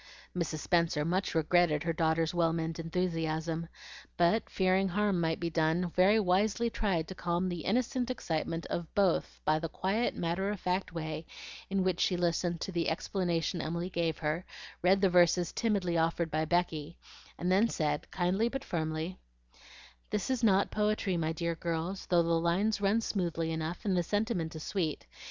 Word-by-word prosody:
Mrs. 165 -3 -2
Spenser 170 -4 +1
much 180 +2 -1
regretted 160 -1 +3
her 165 -1 0
daughter's 160 0 +1
well 165 -2 +2
meant 165 0 -3
enthusiasm, 165 -1 -2 0.5
but 175 +6 +2
fearing 190 0 +2
harm 200 -1 +1
might 160 -1 0
be 170 -1 -2
done, 165 +2 +1
very 195 +5 +4
wisely 210 +4 +2
tried 180 -9 0
to - - -6
calm 175 0 -1
the 175 -1 -3
innocent 250 - 0
excitement 165 -7 -2
of 170 -2 -4
both 195 -4 +1
by 155 0 +3
the 165 0 -4
quiet 200 +9 0
matter 175 +4 -1
of 205 -2 -3
fact 185 +1 -1
way 160 -1 -5 0.4
in 195 -1 +1
which 185 -2 0
she 180 - +2
listened 175 0 0
to - - -3
the 170 -2 0
explanation 170 0 -1
Emily 170 +4 -3
gave 165 -2 0
her, 155 +3 -1 0.4
read 190 +2 +4
the 195 - +5
verses 175 -1 +4
timidly 195 -7 0
offered 165 0 0
by 155 +1 0
Becky, 165 -2 -1 0.4
and 180 +2 -1
then 200 +5 +5
said, 150 -5 -1
kindly 190 +6 +1
but 270 +2 -4
firmly: 160 -1 -3 0.9
"This 210 +5 -1
is 250 -2 -1
not 200 -3 +4
poetry, 210 -2 0
my 160 -2 0
dear 170 +1 -2
girls, 170 +3 -3
though 175 -2 +4
the 165 0 +2
lines 195 +6 +1
run 205 +3 +3
smoothly 170 -6 -1
enough, 160 +6 -4
and 195 -3 +2
the 175 - +3
sentiment 185 -3 -1
is 155 - -6
sweet. 165 -7 -2
175 Hz, 175 wpm, -31 LUFS, 165-190 Hz, 0.9 s, the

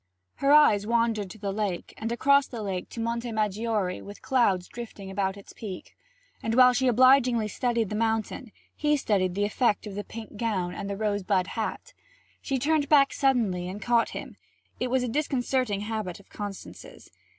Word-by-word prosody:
Her 275 - +2
eyes 215 -9 +6
wandered 230 -4 +1
to 200 - -10
the 200 -2 -3
lake, 200 -4 -3
and 225 +1 -4
across 280 +3 +4
the 230 -4 -6
lake 190 -3 -4
to - - -8
Monte 235 +1 -2
Maggiore 215 -2 -1
with 205 0 -11
clouds 200 -9 +2
drifting 215 -5 -8
about 190 0 -1
its 200 - -13
peak. 195 -5 -8 0.5
And 225 0 -1
while 250 0 +7
she 260 +1 +1
obligingly 250 -2 +5
studied 235 -1 -1
the 210 - -3
mountain, 225 +1 -1 0.2
he 300 0 +2
studied 185 -8 0
the 205 +1 +1
effect 210 +1 +1
of 205 - -7
the 205 +1 -4
pink 220 -1 -9
gown 195 -6 -1
and 200 -1 -5
the 200 - -3
rose 205 -1 0
bud 185 -1 +1
hat. 220 -1 -4 0.5
She 270 - -1
turned 290 +2 +1
back 280 -2 +5
suddenly 215 -10 +1
and 195 +3 -6
caught 235 +2 +2
him; - - -8 0.4
it 250 - -1
was 255 0 +1
a - - -1
disconcerting 255 -5 0
habit 210 -4 -4
of 200 - -20
Constance's. 205 - -9
220 Hz, 185 wpm, -27 LUFS, 200-250 Hz, 0.5 s, while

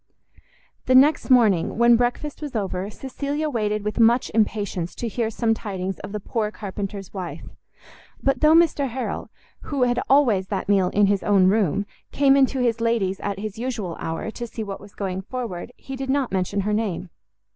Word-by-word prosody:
The 255 - +4
next 285 +4 +5
morning, 215 -11 +4
when 235 0 +6
breakfast 245 +6 -1
was 290 -4 -6
over, 195 -2 -2
Cecilia 285 +6 -3
waited 210 -3 -1
with 210 +2 -3
much 235 +2 +4
impatience 205 -5 -1
to 240 - -3
hear 230 0 -1
some 225 0 +1
tidings 195 -4 -4
of - - -8
the 210 - -3
poor 215 +1 -2
carpenter's 200 -2 -6
wife; 185 -3 -6 0.8
but 275 - +1
though 310 +1 +6
Mr 315 -5 +3
Harrel, 255 +2 -4 0.4
who 280 -4 0
had 245 0 +2
always 235 -9 +4
that 195 -2 -3
meal 195 -3 +3
in 205 +2 +3
his 200 -1 +1
own 200 -3 +4
room, 200 -1 +1 0.3
came 275 -1 +4
into 270 -1 +3
his 230 -2 +1
lady's 220 -5 0
at 200 -1 -3
his 215 +1 -6
usual 225 -9 -3
hour, 165 +7 -4
to 240 +1 -6
see 225 0 -6
what 200 -2 -6
was 200 0 -14
going 190 -2 -3
forward, 230 -2 -5
he 270 - -8
did 265 0 -5
not 270 -2 +1
mention 190 +1 0
her 210 +2 -1
name. 190 -5 -2
220 Hz, 185 wpm, -23 LUFS, 195-250 Hz, 0.8 s, when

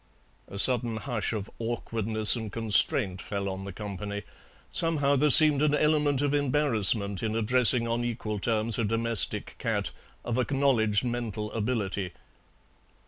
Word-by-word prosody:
A 100 - -10
sudden 120 0 +2
hush 120 -2 -4
of 105 -2 -5
awkwardness 115 -2 0
and 110 -3 -6
constraint 105 -2 -1
fell 100 -1 -5
on 95 0 -6
the 100 - -7
company. 100 +1 -7 0.5
Somehow 145 -4 +3
there 150 +2 +1
seemed 150 -1 +8
an 150 -1 +1
element 150 -2 +1
of 145 0 -1
embarrassment 120 -9 0
in 110 -1 -3
addressing 120 +1 +3
on 115 +1 -2
equal 110 -3 -5
terms 110 +1 -2
a - - 0
domestic 115 +1 0
cat - - -3 0.3
of 120 +1 -2
acknowledged 125 -6 0
dental 110 -3 -5
ability. 105 -5 -4
115 Hz, 140 wpm, -26 LUFS, 105-130 Hz, 0.5 s, seemed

